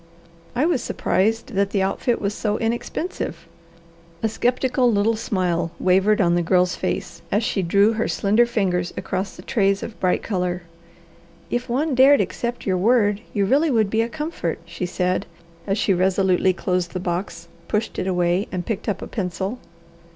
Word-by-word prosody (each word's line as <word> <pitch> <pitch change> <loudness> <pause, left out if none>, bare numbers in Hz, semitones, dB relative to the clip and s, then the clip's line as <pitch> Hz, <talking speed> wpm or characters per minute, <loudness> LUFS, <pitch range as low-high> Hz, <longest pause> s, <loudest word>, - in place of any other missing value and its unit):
I 260 +5 +2
was 325 -7 +1
surprised 225 +6 0
that 200 0 +1
the 200 -1 +1
outfit 230 +5 0
was 200 0 -1
so 210 0 -1
inexpensive." 235 +10 -3 0.8
A 220 - +2
skeptical 250 +2 +1
little 215 +2 +2
smile 180 -6 -1
wavered 190 +3 +3
on 175 -3 +3
the 175 - +2
Girl's 180 +1 +2
face - - -3
as 210 +3 +2
she 205 - 0
drew 200 +5 +3
her 225 +1 -1
slender 215 +4 +2
fingers 185 -6 0
across 190 +1 -3
the 180 - -11
trays 200 -2 +1
of 225 - -8
bright 180 -1 +1
colour. 180 -3 -2 0.9
"If 245 0 -2
one 280 +5 0
dared 270 +3 +6
accept 225 +5 -3
your 185 -2 +1
word, 205 0 +3
you 200 -2 +1
really 290 +10 +3
would 220 -6 +2
be 220 - +2
a 230 - -1
comfort," 300 - -3
she 170 +2 -4
said, 180 +2 -1 0.4
as 195 +1 +1
she 200 -2 +2
resolutely 185 0 +2
closed 180 -1 -2
the 185 - -2
box, 180 +1 -4 0.2
pushed 215 +1 -2
it 185 - -2
away, 180 +1 +1
and 180 -2 -3
picked 220 -1 -3
up 195 - -2
a - - -6
pencil. 195 +3 -3
200 Hz, 175 wpm, -22 LUFS, 185-230 Hz, 0.9 s, dared